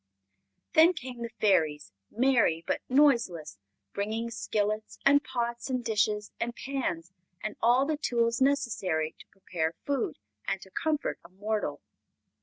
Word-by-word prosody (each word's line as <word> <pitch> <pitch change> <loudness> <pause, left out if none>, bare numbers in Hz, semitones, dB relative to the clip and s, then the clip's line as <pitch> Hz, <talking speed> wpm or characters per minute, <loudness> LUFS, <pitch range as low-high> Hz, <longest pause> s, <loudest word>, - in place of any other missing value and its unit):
Then 325 +3 +7
came 255 -7 -7
the 235 - -3
Fairies, 155 - +2 0.2
merry 235 -9 +2
but - - -1
noiseless, 235 - +3 0.3
bringing 220 +3 -2
skillets 215 -1 -2
and 285 +1 +6
pots 240 -1 -3
and 255 -2 -1
dishes 210 -2 +1
and 235 +1 -2
pans 185 -11 -3 0.3
and 215 0 -3
all 245 +4 +4
the 305 0 -1
tools 235 -4 +1
necessary 210 - +1
to - - -14
prepare 165 -4 -3
food 275 - -1 0.3
and - - 0
to 190 - -16
comfort 305 +6 -1
a 170 - -14
mortal. 210 +3 -3
230 Hz, 135 wpm, -29 LUFS, 195-260 Hz, 0.3 s, Then